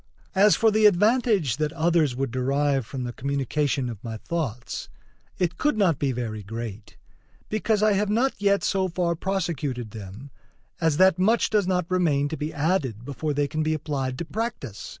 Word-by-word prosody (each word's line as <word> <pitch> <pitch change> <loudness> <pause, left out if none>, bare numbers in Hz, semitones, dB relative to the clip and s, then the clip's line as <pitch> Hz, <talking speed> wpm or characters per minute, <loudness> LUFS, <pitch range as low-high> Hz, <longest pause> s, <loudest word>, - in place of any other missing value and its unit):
As 200 +2 +5
for 225 -1 +3
the 215 0 +6
advantage 205 - +2
that 150 -1 0
others 165 -5 +2
would 135 -1 -2
derive 135 0 0
from 130 0 -5
the 120 -1 -4
communication 140 0 -1
of 115 -4 -7
my 115 -2 -5
thoughts, 125 -4 -4 0.5
it 180 -1 -1
could 295 -6 +1
not 180 -9 +2
be 140 -2 +1
very 115 -4 -4
great; 110 -1 -7 0.5
because 215 0 +1
I 215 -1 +4
have 200 +1 +1
not 240 +6 +2
yet 200 -1 +3
so 190 -1 +1
far 175 -1 0
prosecuted 160 - -2
them 110 +6 -9 0.5
as 160 -3 +2
that 185 -1 +5
much 220 +5 +3
does 210 -4 +2
not 180 -2 +1
remain 155 -6 +1
to 160 - -3
be 150 +1 -4
added 145 - -1
before 145 +2 -3
they 145 0 +1
can 155 +2 -2
be 155 0 +1
applied 135 -4 -3
to 170 - -4
practice. 190 - -5
155 Hz, 180 wpm, -25 LUFS, 130-190 Hz, 0.5 s, the